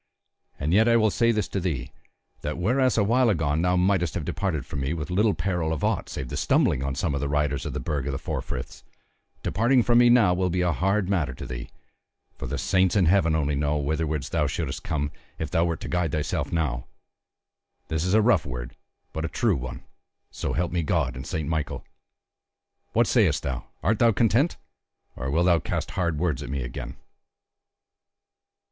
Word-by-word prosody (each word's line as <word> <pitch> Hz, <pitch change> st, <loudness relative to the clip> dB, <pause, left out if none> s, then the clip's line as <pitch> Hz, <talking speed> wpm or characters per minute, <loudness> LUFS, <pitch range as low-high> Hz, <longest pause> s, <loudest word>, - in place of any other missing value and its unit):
And 75 Hz, +4 st, 0 dB
yet 110 Hz, +4 st, +5 dB
I 115 Hz, 0 st, +5 dB
will 110 Hz, -2 st, +3 dB
say 115 Hz, +3 st, +3 dB
this 105 Hz, -2 st, 0 dB
to 100 Hz, -, -2 dB
thee, 75 Hz, -9 st, -3 dB, 0.5 s
that 75 Hz, +1 st, -3 dB
whereas 125 Hz, +8 st, +2 dB
awhile 115 Hz, +4 st, +3 dB
agone 80 Hz, -5 st, +1 dB
thou 90 Hz, +1 st, +2 dB
mightest 90 Hz, -3 st, +1 dB
have 85 Hz, -4 st, -3 dB
departed 85 Hz, -6 st, -2 dB
from 70 Hz, -, -5 dB
me 70 Hz, +5 st, -1 dB
with 80 Hz, 0 st, -5 dB
little 105 Hz, +3 st, +2 dB
peril 90 Hz, -5 st, -1 dB
of 80 Hz, -, -3 dB
aught -, -, 0 dB
save 65 Hz, -, -5 dB
the -, -, -4 dB
stumbling 65 Hz, -, +2 dB
on 70 Hz, 0 st, -2 dB
some 70 Hz, +3 st, -1 dB
of 70 Hz, -, -2 dB
the 70 Hz, -, -1 dB
riders 75 Hz, -2 st, 0 dB
of -, -, -4 dB
the -, -, -3 dB
Burg 70 Hz, -2 st, -2 dB
of -, -, -1 dB
the 70 Hz, -, -3 dB
Four -, -, -3 dB
Friths, 60 Hz, 0 st, -7 dB, 0.6 s
departing 120 Hz, +8 st, +3 dB
from 120 Hz, 0 st, +4 dB
me 120 Hz, 0 st, +6 dB
now 115 Hz, -7 st, +5 dB
will 90 Hz, 0 st, 0 dB
be 90 Hz, +1 st, 0 dB
a 90 Hz, -1 st, +2 dB
hard 95 Hz, +5 st, +1 dB
matter 85 Hz, -9 st, 0 dB
to -, -, -7 dB
thee; -, -, -6 dB, 0.7 s
for -, -, -6 dB
the -, -, -3 dB
saints 95 Hz, 0 st, +2 dB
in 95 Hz, -3 st, +4 dB
Heaven 85 Hz, -2 st, +3 dB
only 75 Hz, -2 st, 0 dB
know 75 Hz, +1 st, 0 dB
whitherward 75 Hz, 0 st, -1 dB
thou 75 Hz, +1 st, 0 dB
shouldest 70 Hz, -1 st, -3 dB
come, 75 Hz, -1 st, -2 dB, 0.3 s
if -, -, -4 dB
thou 85 Hz, -, +2 dB
wert 85 Hz, -2 st, -2 dB
to -, -, -5 dB
guide 90 Hz, -4 st, -1 dB
thyself 75 Hz, -2 st, -1 dB
now. 60 Hz, -7 st, -1 dB, 1.0 s
This 80 Hz, +3 st, -1 dB
a 110 Hz, +2 st, +4 dB
rough 105 Hz, -8 st, +4 dB
word, 60 Hz, -2 st, -6 dB, 0.4 s
but 80 Hz, -, -3 dB
a -, -, 0 dB
true -, -, +1 dB
one, 65 Hz, -1 st, -6 dB, 0.5 s
so -, -, -3 dB
help 90 Hz, +1 st, -1 dB
me 85 Hz, 0 st, 0 dB
God 75 Hz, -5 st, 0 dB
and 65 Hz, 0 st, -7 dB
Saint 80 Hz, -2 st, -3 dB
Michael! 80 Hz, -3 st, -2 dB, 1.1 s
What -, -, +4 dB
sayest -, -, +2 dB
thou; 65 Hz, -2 st, -3 dB, 0.2 s
art 110 Hz, +5 st, +2 dB
thou 115 Hz, -1 st, +5 dB
content, 115 Hz, -, +2 dB, 0.6 s
or 65 Hz, +2 st, -4 dB
wilt 85 Hz, +5 st, +2 dB
thou 85 Hz, -2 st, +4 dB
cast -, -, -3 dB
hard 85 Hz, -4 st, -1 dB
words 80 Hz, -5 st, 0 dB
at -, -, -6 dB
me 70 Hz, -1 st, -2 dB
again?" -, -, -6 dB
80 Hz, 205 wpm, -25 LUFS, 70-95 Hz, 1.1 s, me